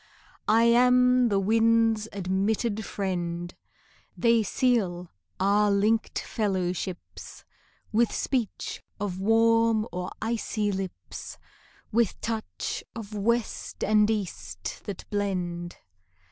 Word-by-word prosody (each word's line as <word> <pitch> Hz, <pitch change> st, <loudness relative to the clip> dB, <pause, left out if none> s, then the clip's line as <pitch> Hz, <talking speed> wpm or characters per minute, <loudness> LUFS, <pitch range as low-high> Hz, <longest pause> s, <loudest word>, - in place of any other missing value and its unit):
I 225 Hz, +2 st, +5 dB
am 250 Hz, +1 st, +5 dB
the 200 Hz, -2 st, +2 dB
winds' 225 Hz, +1 st, +3 dB
admitted 200 Hz, +3 st, -1 dB
friend: 175 Hz, -4 st, -3 dB, 0.6 s
They 230 Hz, -1 st, +4 dB
seal 195 Hz, -6 st, 0 dB, 0.3 s
our 205 Hz, +2 st, +3 dB
linked 210 Hz, +3 st, +1 dB
fellowships 185 Hz, -3 st, -3 dB, 0.5 s
With 230 Hz, +1 st, +3 dB
speech 250 Hz, -6 st, -2 dB, 0.2 s
of 190 Hz, -2 st, -3 dB
warm 225 Hz, +1 st, +3 dB
or 180 Hz, +1 st, -4 dB
icy 220 Hz, -2 st, -1 dB
lips, 190 Hz, -1 st, -6 dB, 0.5 s
With 230 Hz, -2 st, +1 dB
touch 225 Hz, -1 st, -4 dB
of 220 Hz, -2 st, -7 dB
west 230 Hz, +3 st, -1 dB
and 210 Hz, 0 st, +4 dB
east 105 Hz, -, -4 dB
that 200 Hz, -3 st, -7 dB
blend. 180 Hz, -4 st, -2 dB
210 Hz, 95 wpm, -27 LUFS, 190-230 Hz, 0.6 s, I